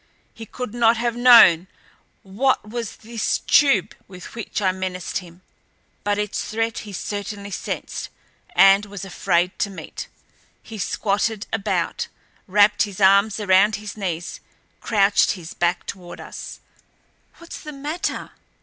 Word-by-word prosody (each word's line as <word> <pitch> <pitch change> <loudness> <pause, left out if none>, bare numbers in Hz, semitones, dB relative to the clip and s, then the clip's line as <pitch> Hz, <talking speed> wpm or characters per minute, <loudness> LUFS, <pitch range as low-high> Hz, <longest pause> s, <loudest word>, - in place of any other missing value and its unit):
He 225 -1 -10
could 250 -1 -6
not 235 -1 +3
have 235 0 -1
known 230 -8 +7 0.6
what 215 +4 0
was 230 0 -5
this 225 0 -2
tube 275 -10 +3
with 185 -2 -11
which 230 -1 -4
I 190 -3 +2
menaced 185 -1 -4
him, 175 0 -15 0.6
but 205 0 0
its 210 -1 -2
threat 225 +1 -2
he 210 - -9
certainly 200 +1 -5
sensed - - -5 0.5
and 195 +2 +6
was 200 -1 -7
afraid 180 -1 0
to 205 - 0
meet. 195 - -8 0.6
He 220 -2 -9
squattered 210 +2 -1
about, 200 +1 -1 0.4
wrapped 205 +1 +4
his 205 -2 -1
arms 200 +2 +4
around 205 +1 +4
his 210 0 -7
knees, 175 -5 -4 0.4
crouched 200 -2 +2
with 170 -2 -11
back 175 0 +1
toward 180 -2 -8
us. - - -9 0.8
"What's 340 - -10
the 305 - -8
matter?" 295 +4 -4
205 Hz, 135 wpm, -22 LUFS, 190-225 Hz, 0.8 s, known